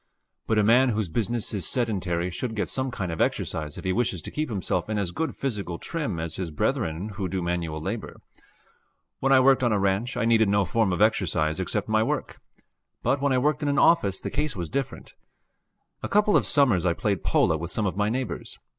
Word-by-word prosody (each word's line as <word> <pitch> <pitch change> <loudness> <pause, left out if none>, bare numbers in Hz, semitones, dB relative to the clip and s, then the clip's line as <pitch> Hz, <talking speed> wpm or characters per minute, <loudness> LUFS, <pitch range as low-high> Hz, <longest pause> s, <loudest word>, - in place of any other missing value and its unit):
But 110 - +1
a 105 - +4
man 125 +5 +5
whose 110 -5 -1
business 115 +6 -1
is 100 -4 0
sedentary 90 -8 0
should 110 +6 -4
get 105 - -1
some 130 0 -2
kind 95 -8 -4
of 80 - -3
exercise 75 -2 -1
if - - -7
he 95 -1 0
wishes 95 -6 -1
to - - -6
keep 155 -1 -2
himself 95 -3 -2
in 110 - -1
as 95 -4 -1
good 160 - -3
physical 100 -10 -3
trim 150 - -4
as 80 -1 -3
his 90 -3 -3
brethren 80 +4 -1
who 100 -2 -4
do 95 - -2
manual 85 -3 -2
labor. 100 +8 -5 1.0
When 135 - +1
I 135 - +7
worked 135 0 +5
on 120 -2 +2
a 105 - +2
ranch, 100 +6 0
I 125 - +1
needed 110 -2 +4
no 100 0 +2
form 110 +2 +1
of 90 +4 +2
exercise 80 -7 +1
except 100 +2 -2
my 110 0 +2
work, - - -2 0.6
but 135 - +1
when 140 -1 +2
I 130 - +3
worked 150 +5 +1
in 145 - 0
an 140 - 0
office 100 - +4
the - - -5
case 150 -1 -1
was 85 -4 -5
different. 135 -1 -4 0.9
A - - -4
couple 210 0 +3
of - - +3
summers 125 - +3
I 90 -2 +2
played 100 0 -1
polo 80 - +2
with 85 +2 -4
some 105 +3 -1
of 95 - -1
my 105 +1 +1
neighbors. 130 +3 -4
105 Hz, 220 wpm, -26 LUFS, 90-125 Hz, 1.0 s, I